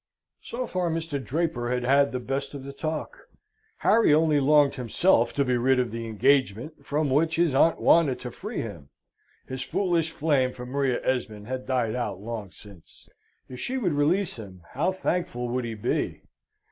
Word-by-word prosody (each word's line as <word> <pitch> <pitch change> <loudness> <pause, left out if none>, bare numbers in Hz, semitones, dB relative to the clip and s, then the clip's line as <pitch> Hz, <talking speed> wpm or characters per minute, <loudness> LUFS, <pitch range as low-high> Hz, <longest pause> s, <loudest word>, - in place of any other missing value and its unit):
So 250 +2 -4
far 185 -6 -1
Mr. 160 -4 -3
Draper 140 -5 -1
had 125 0 -1
had 140 +2 +3
the 125 - -2
best 135 +3 -4
of 135 - -7
the 140 0 -8
talk. 155 +2 -4 0.6
Harry 225 -5 +4
only 155 -2 +3
longed 145 0 +4
himself 125 - +2
to 140 - +1
be 125 -1 +1
rid 130 +2 +3
of 125 -3 0
the 115 0 -5
engagement 130 +4 +1
from 145 0 -1
which 160 +4 +2
his 170 -4 +2
aunt 160 +4 +4
wanted 150 -6 +4
to 125 - -6
free 210 - -5
him. 85 -11 -8 0.6
His 130 0 -5
foolish 170 +2 0
flame 145 -5 +1
for 125 - -8
Maria 130 0 0
Esmond 110 -5 -2
had 130 +2 -5
died 125 -4 0
out 110 -6 -3
long 110 -2 -6
since. 100 -5 -16 0.4
If 125 -1 -9
she 260 - -3
would 190 - 0
release 160 +6 +1
him, 95 -5 -11
how 165 +8 0
thankful 170 -10 -2
would 125 0 -1
he 115 -1 -4
be! 105 - -2
135 Hz, 180 wpm, -26 LUFS, 120-160 Hz, 0.6 s, Harry